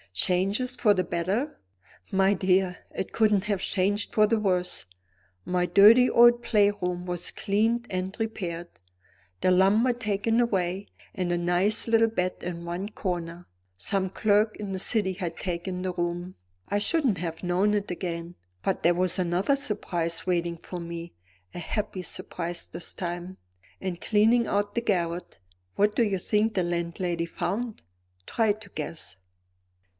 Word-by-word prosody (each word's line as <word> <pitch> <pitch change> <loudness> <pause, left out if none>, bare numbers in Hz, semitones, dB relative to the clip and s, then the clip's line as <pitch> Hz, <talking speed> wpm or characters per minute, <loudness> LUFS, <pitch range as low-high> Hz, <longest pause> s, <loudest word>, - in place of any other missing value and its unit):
"Changes 195 - +1
for 215 -4 +4
the 185 -2 +1
better?" 190 - -2 0.5
"My 195 +1 +4
dear, 185 -1 +1
it - - -4
couldn't 210 -3 +3
have 200 -3 0
changed 205 +3 0
for 215 - +5
the 225 0 +2
worse! 180 - 0 0.6
My 180 0 +1
dirty 220 +7 +7
old 240 0 +6
play 205 -3 +4
room 180 -3 -3
was 175 -1 -3
cleaned 225 +4 0
and 185 +1 -3
repaired; 175 -6 -3 0.7
the 185 - +3
lumber 205 +7 +4
taken 225 0 0
away, 195 -4 0 0.3
and 180 -2 -2
a 175 - +1
nice 180 +6 +1
little 225 0 +4
bed 185 -4 -1
in 170 -1 -5
one 175 +4 -4
corner. 175 -4 -4 0.3
Some 190 - -1
clerk 210 +2 +2
in 200 -2 -5
the 190 - -3
City 200 -1 +1
had 175 -3 -5
taken 180 0 -3
the 185 -1 -2
room 175 +1 -3 0.3
I 205 - 0
shouldn't 255 - +1
have 165 -1 -4
known 185 +4 +2
it 205 -1 -2
again. 170 -1 -4 0.3
But 190 - -1
there 175 +1 +4
was 180 0 +1
another 185 +8 +1
surprise 175 -10 -2
waiting 170 -2 0
for 180 +2 -7
me; 170 0 -7 0.4
a - - -6
happy 200 +1 -3
surprise 175 0 -4
this 170 +1 -6
time. 175 +1 -5 0.4
In 185 -2 -3
cleaning 225 +5 +3
out 205 0 0
the 235 - 0
garret, 175 -5 -1 0.4
what 210 +1 +2
do 235 - +4
you 200 -3 +1
think 210 +3 +1
the 185 - +2
landlady 170 0 -2
found? 225 +6 -3 0.4
Try 220 -2 +2
to 215 -1 -13
guess." 155 - -5
190 Hz, 155 wpm, -27 LUFS, 175-210 Hz, 0.7 s, dirty